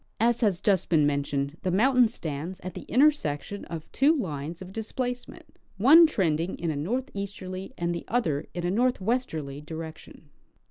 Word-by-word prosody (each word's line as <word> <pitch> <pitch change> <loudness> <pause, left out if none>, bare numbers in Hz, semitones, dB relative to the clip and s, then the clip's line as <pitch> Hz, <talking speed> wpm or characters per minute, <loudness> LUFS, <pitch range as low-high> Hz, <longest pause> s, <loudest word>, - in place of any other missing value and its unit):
As 235 +2 +2
has 200 -6 +2
just 195 -4 +2
been 155 -4 +4
mentioned, 140 0 -1
the 185 - -1
mountain 245 +6 +4
stands 170 -3 -5
at 185 - -6
the - - -9
intersection 205 - +1
of 165 -2 -6
two 280 +3 +4
lines 160 - -4
of 185 0 -10
displacement, 245 +3 -5 0.2
one 310 - +8
trending 170 - 0
in 170 -2 -2
a - - -3
northeasterly 200 - -4
and 170 0 -1
the 170 - -5
other 160 -11 0
in 175 -1 -3
a 175 - +1
northwesterly 200 - -1
direction. 160 -1 -9
185 Hz, 155 wpm, -27 LUFS, 160-235 Hz, 0.2 s, one